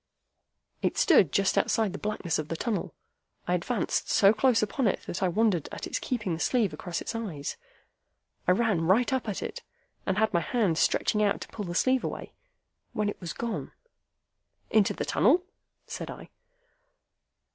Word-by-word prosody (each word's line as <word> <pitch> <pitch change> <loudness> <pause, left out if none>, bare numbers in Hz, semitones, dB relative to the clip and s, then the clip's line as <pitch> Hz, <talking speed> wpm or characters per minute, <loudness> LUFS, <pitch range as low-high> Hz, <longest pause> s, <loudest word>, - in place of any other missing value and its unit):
It - - 0
stood 210 - +5
just 195 -1 +2
outside 220 -5 +1
the 195 - -6
blackness 210 -6 -2
of 155 - -4
the 165 - -3
tunnel. 220 +4 -3 0.5
I - - +1
advanced - - -1
so 200 +1 +5
close 225 0 +3
upon 230 +4 0
it 195 - 0
that 175 - -5
I 190 - +3
wondered 190 -3 +1
at - - -6
its - - -2
keeping 210 -8 -2
the 160 - -4
sleeve 220 -7 +1
across 170 +3 -4
its - - -4
eyes. 190 -11 -4 0.9
I 180 - +6
ran 195 -6 +1
right 235 +8 +3
up 250 -4 -1
at 200 - -3
it, - - -6 0.5
and 190 0 +1
had 220 0 +2
my 170 - +4
hand 180 -1 +1
stretched - - +2
out 210 -1 +2
to - - -6
pull 210 - -6
the 175 -1 -5
sleeve 260 +5 +2
away, - - -5 0.6
when 210 -1 0
it 205 - -7
was 175 - -4
gone." 235 -1 -4 1.0
"Into 215 -3 +3
the - - -3
tunnel?" 310 - +3 0.4
said - - -6
I. - - -9
205 Hz, 180 wpm, -28 LUFS, 175-230 Hz, 1.0 s, I